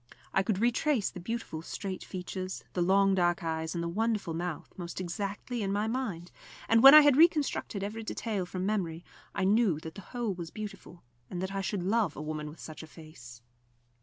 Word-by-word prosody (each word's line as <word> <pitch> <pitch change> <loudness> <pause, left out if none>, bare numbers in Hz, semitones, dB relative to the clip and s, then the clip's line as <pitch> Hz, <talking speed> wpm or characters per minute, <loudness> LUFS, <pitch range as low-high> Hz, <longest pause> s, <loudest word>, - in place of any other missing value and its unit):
I 195 - +4
could 195 0 0
retrace 240 +2 +1
the 180 - -8
beautiful 210 -4 -4
straight 190 +3 -5
features, 185 0 -5
the 180 - -1
long 195 +2 +4
dark 175 -2 +2
eyes 160 0 -2
and 170 - -1
the - - -2
wonderful 210 -1 -1
mouth, 170 -1 -4
most 175 -1 -6
exactly 200 +6 -4
in 195 -1 -1
my 205 +2 0
mind, 220 -8 -3 0.4
and, 225 0 +5
when 275 +3 +11
I 305 - +12
had 290 -3 +5
reconstructed 295 - +3
every 215 +3 -4
detail 215 -4 -3
from 185 +1 -3
memory, 175 -5 -2 0.3
I 195 - 0
knew 200 -4 +3
that 160 0 -7
the 200 - -9
whole 235 0 -3
was 170 -2 -6
beautiful, 195 -4 -9 0.3
and 180 - -4
that 190 +1 -3
I 195 - -1
should 195 -1 -2
love 200 -3 +1
a - - -7
woman 155 -1 -4
with 155 - -12
such 155 - -8
a 160 - -10
face. 125 -8 -13
190 Hz, 200 wpm, -30 LUFS, 170-220 Hz, 0.4 s, I